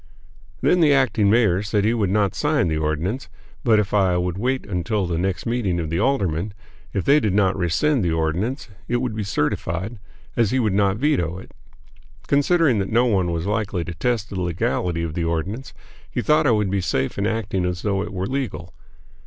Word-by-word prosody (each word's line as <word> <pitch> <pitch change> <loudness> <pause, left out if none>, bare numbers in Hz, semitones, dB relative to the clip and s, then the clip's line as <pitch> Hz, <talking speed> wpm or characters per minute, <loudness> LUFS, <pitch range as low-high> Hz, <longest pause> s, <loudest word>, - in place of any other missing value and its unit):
Then 180 - +3
the 150 -4 +5
acting 115 -6 +2
mayor 105 -4 +3
said 105 0 0
he 110 - +3
would 105 -5 0
not 100 -1 +1
sign 150 - +1
the 80 - 0
ordinance; 80 - -2 0.3
but 115 -3 +4
if 105 -1 0
I 95 -4 +3
would 90 -1 -1
wait 130 +6 -1
until 100 +1 -1
the 85 -1 -2
next 90 -2 -2
meeting 115 -7 0
of 80 -2 -3
the 85 - 0
aldermen, 100 - 0 0.4
if 100 - -2
they 145 +2 +5
did 105 -8 0
not 100 -2 +3
rescind 100 - +1
the 85 - +1
ordinance, 85 - -1 0.2
it 120 - +1
would 120 -3 -2
be 110 - -2
certified, 95 +2 -2 0.4
as 115 -4 +2
he 130 - 0
would 110 -6 +1
not 100 0 +2
veto 90 - 0
it. 95 - -11 0.7
Considering 145 - +3
that 95 - -2
no 120 +3 +3
one 95 -7 +1
was 85 0 -2
likely 105 -3 -1
to 85 - -6
test 115 +4 -1
the 95 -2 -3
legality 85 0 -1
of 80 -2 -3
the 85 - -2
ordinance, 85 - -3 0.4
he - - -3
thought 155 0 +3
I - - +5
would 105 -3 +1
be 100 -1 0
safe 75 -3 -1
in 100 - +1
acting 110 -4 -1
as 90 -1 -2
though 100 -2 0
it - - -5
were 95 -1 -3
legal. 110 -9 -4
100 Hz, 205 wpm, -22 LUFS, 90-120 Hz, 0.7 s, the